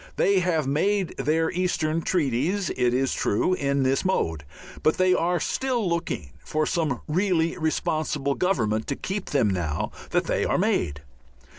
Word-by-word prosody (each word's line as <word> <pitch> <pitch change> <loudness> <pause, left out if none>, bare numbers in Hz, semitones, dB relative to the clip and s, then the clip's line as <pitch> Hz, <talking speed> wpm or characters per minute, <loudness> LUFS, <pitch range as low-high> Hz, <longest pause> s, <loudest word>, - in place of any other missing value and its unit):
They 200 -1 +3
have 170 -4 +1
made 185 +7 +1
their 160 +1 +1
eastern 165 -3 0
treaties, 165 +4 0
it 125 -1 +1
is 130 +2 +1
true, 110 - +1
in 140 -4 0
this 130 +1 +1
mode, 80 - 0 0.4
but 155 - +2
they 185 0 +4
are 175 0 +1
still 245 +1 -1
looking 170 - -2
for 155 0 -1
some 150 -8 -1
really 165 0 +1
responsible 155 -3 0
government 110 - 0
to - - -1
keep 195 +1 -4
them 135 -6 +2
now 80 -5 -2 0.2
that - - +1
they - - 0
are - - +1
made. 75 -4 0
155 Hz, 155 wpm, -25 LUFS, 130-180 Hz, 0.4 s, they